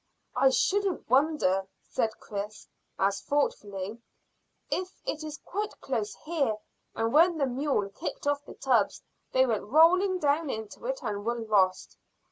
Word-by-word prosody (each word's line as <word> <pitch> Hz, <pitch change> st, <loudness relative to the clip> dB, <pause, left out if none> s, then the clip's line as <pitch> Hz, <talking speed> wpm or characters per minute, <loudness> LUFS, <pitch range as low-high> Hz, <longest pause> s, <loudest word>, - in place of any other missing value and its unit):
"I 270 Hz, -, +5 dB
shouldn't 390 Hz, +7 st, +1 dB
wonder," 260 Hz, -10 st, +3 dB, 0.2 s
said 225 Hz, -, 0 dB
Chris, 205 Hz, 0 st, -6 dB, 0.3 s
as 195 Hz, +1 st, +1 dB
thoughtfully, 210 Hz, -7 st, -2 dB, 0.7 s
"if 370 Hz, +1 st, -3 dB
it 310 Hz, -, -3 dB
is 305 Hz, -1 st, -6 dB
quite 420 Hz, +3 st, -4 dB
close 225 Hz, -6 st, -2 dB
here, 285 Hz, -10 st, 0 dB, 0.4 s
and 225 Hz, +1 st, 0 dB
when 335 Hz, +3 st, +6 dB
the 280 Hz, -, +2 dB
mule 260 Hz, -5 st, 0 dB
kicked 200 Hz, -, -6 dB
off 290 Hz, 0 st, +1 dB
the -, -, -11 dB
tubs 245 Hz, -6 st, +1 dB, 0.3 s
they 260 Hz, 0 st, +4 dB
went 225 Hz, -5 st, -1 dB
rolling 350 Hz, -, +5 dB
down 295 Hz, -1 st, +1 dB
into 220 Hz, 0 st, -5 dB
it 265 Hz, +2 st, -3 dB
and 205 Hz, -3 st, -3 dB
were 235 Hz, +2 st, -1 dB
lost." 200 Hz, -5 st, +1 dB
260 Hz, 145 wpm, -29 LUFS, 210-310 Hz, 0.7 s, when